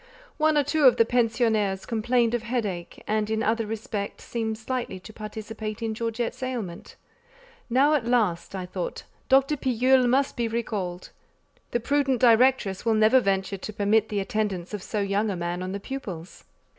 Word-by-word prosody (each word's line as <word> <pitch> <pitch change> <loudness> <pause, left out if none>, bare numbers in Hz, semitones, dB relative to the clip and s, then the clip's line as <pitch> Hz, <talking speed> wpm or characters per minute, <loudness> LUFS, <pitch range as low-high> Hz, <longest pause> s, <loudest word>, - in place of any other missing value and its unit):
One 310 -1 +3
or 290 - +4
two 305 +1 +1
of 255 - +7
the 230 - +5
pensionnaires 225 -5 +1
complained 235 +1 +1
of 240 - 0
headache, 215 -7 -4
and 215 0 0
in 220 0 0
other 225 0 0
respects 210 -2 -4
seemed 220 -2 -3
slightly 235 -3 -4
to 220 +4 -12
participate 215 0 -6
in 225 -1 -1
Georgette's 230 +2 -3
ailment. 235 -9 -5 0.7
"Now, 270 +5 +4
at 260 -6 +1
last," 205 -7 +1
I 185 -1 -4
thought, - - -5 0.3
"Dr. 275 +2 +4
Pillule 255 -1 +3
must 270 +3 +2
be 235 -2 0
recalled: 205 -6 -3 0.6
the 240 - 0
prudent 270 0 +1
directress 235 -5 +4
will 225 -1 +2
never 215 +4 +5
venture 195 -3 0
to 215 +3 -7
permit 210 +2 +2
the 205 - -1
attendance 195 -2 -2
of 205 - -4
so 210 +2 -3
young 200 +2 0
a 195 - -2
man 175 +1 -3
on 185 0 -4
the 200 - -4
pupils." 195 -8 -7
220 Hz, 170 wpm, -26 LUFS, 200-245 Hz, 0.7 s, of